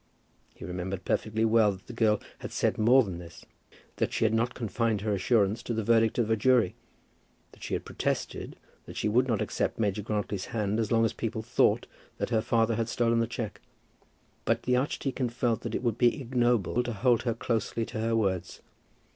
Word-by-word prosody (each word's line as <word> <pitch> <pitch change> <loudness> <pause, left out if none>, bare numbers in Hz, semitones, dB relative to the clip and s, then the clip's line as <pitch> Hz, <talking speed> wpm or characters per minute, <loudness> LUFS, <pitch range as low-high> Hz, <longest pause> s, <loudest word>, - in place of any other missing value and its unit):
He - - -9
remembered 90 +1 -4
perfectly 110 +1 0
well 110 -2 +4
that 95 - -13
the 120 - -9
girl 110 -2 +2 0.2
had - - -7
said - - 0
more 125 +5 +6
than 95 -5 -6
this, 85 -1 -12 0.5
that - - 0
she - - +1
had 110 - +2
not 120 +2 0
confined 115 -2 -1
her 105 0 0
assurance 105 +2 +2
to 115 - -3
the 110 - -1
verdict 115 0 +3
of 115 -2 +1
a - - +5
jury, 115 -3 +3 0.8
that - - -19
she - - -2
had - - -5
protested - - -3 0.3
that - - -9
she - - 0
would 125 +5 +3
not 115 -5 +1
accept - - -2
Major 105 -2 0
Grantly's 105 -2 -2
hand 105 -2 -1
as 110 -2 -1
long 115 -1 +4
as 110 - -1
people 110 -1 -3
thought 120 - +2 0.3
that - - -3
her 110 -2 +3
father 115 -1 +1
had 115 0 -1
stolen 115 -1 +2
the 115 - +1
cheque; 115 -2 -5 0.8
but - - 0
the 125 - +2
archdeacon 130 -1 -1
felt 120 -1 0
that 115 -2 -4
it - - -3
would 120 -1 0
be 120 +4 +3
ignoble 120 -4 +1
to 120 -1 -3
hold 120 +2 +2
her 120 -2 -1
closely 115 -1 -1
to 110 - -6
her 115 +1 0
words. 95 -5 -1
115 Hz, 205 wpm, -28 LUFS, 105-120 Hz, 0.8 s, more